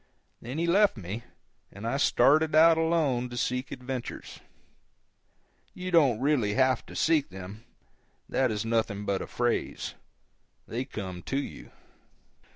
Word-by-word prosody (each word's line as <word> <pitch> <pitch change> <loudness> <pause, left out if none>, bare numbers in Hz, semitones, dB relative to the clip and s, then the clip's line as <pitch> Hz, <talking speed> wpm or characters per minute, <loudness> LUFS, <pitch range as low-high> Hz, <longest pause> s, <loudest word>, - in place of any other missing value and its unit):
Then 125 +5 -6
he 170 - 0
left 195 - +4
me, 105 +4 -6 0.5
and 100 +3 -9
I 120 +4 0
started 155 +2 +4
out 165 +1 +7
alone 160 -7 +1
to 120 - -7
seek 125 +2 -2
adventures. 125 -1 -6 1.4
You 185 0 -5
don't 140 -10 +4
really 130 -7 +1
have 130 -1 +2
to - - -11
seek 155 -3 +2
them—that 100 +6 -6
is 105 0 -2
nothing 110 -3 -1
but 100 -1 -1
a - - -5
phrase—they 120 0 -5
come 95 -8 -6
to 135 - -3
you. 140 - -6
125 Hz, 130 wpm, -28 LUFS, 110-155 Hz, 1.4 s, out